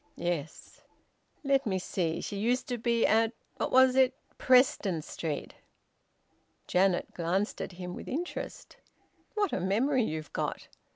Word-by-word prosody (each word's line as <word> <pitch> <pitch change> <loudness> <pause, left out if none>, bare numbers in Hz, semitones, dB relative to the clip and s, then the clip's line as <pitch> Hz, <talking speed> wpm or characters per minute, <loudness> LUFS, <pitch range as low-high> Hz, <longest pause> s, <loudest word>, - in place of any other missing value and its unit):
"Yes." 165 -4 -4 0.6
"Let 275 -3 +2
me 190 -2 +1
see 175 -3 -2
she 205 - -5
used 245 +4 +1
to 245 -1 -2
be 235 0 +2
at 225 +1 +3 0.2
what - - -2
was 260 0 +6
it? 260 0 +4 0.2
Preston 250 - +3
Street?" 155 -2 -4 1.1
Janet 185 -1 +1
glanced 180 +5 -1
at - - -5
him 180 0 -6
with - - -8
interest: 345 +6 -5 0.6
"What 410 -4 +1
a - - 0
memory 245 +9 +2
you've 155 -5 -4
got! - - -3
215 Hz, 135 wpm, -30 LUFS, 175-255 Hz, 1.1 s, was